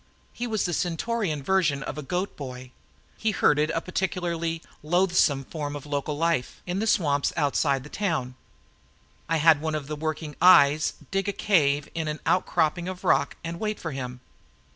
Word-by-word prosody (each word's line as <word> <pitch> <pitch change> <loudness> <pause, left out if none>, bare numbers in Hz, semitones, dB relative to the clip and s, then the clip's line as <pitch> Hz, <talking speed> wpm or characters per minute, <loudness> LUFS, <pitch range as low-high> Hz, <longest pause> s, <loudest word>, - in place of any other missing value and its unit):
He 245 - -4
was 215 -3 0
the 175 - -1
Centaurian 175 -2 -1
version 155 -6 +1
of - - -5
a 150 - -5
goat 180 +7 -3
boy 130 -2 -8 0.5
he 220 - +1
herded 150 -7 +3
a 165 0 -1
particularly 170 -3 -2 0.2
loathsome 170 -4 +2
form 145 -1 -5
of 145 - -7
local 145 0 -2
life 165 -5 0
in 180 +2 -2
the 220 - -1
swamps 145 -8 +2
outside 140 -2 +1
the 150 - -11
town. 160 -11 -1 1.0
I 165 - +2
had 155 -1 +5
one 160 -1 -1
of 150 -2 -3
the 150 +2 -4
working 155 0 -4
eyes 155 -4 +6 0.2
dig 195 0 0
a - - +1
cave 150 -8 +2
in 160 -1 -2
an 150 0 -3
outcropping 175 -1 +1
of 185 -1 -6
rock - - +2
and 170 +1 -5
wait 215 -1 -2
for 160 - -4
him. 125 -2 -6
160 Hz, 175 wpm, -26 LUFS, 145-180 Hz, 1.0 s, eyes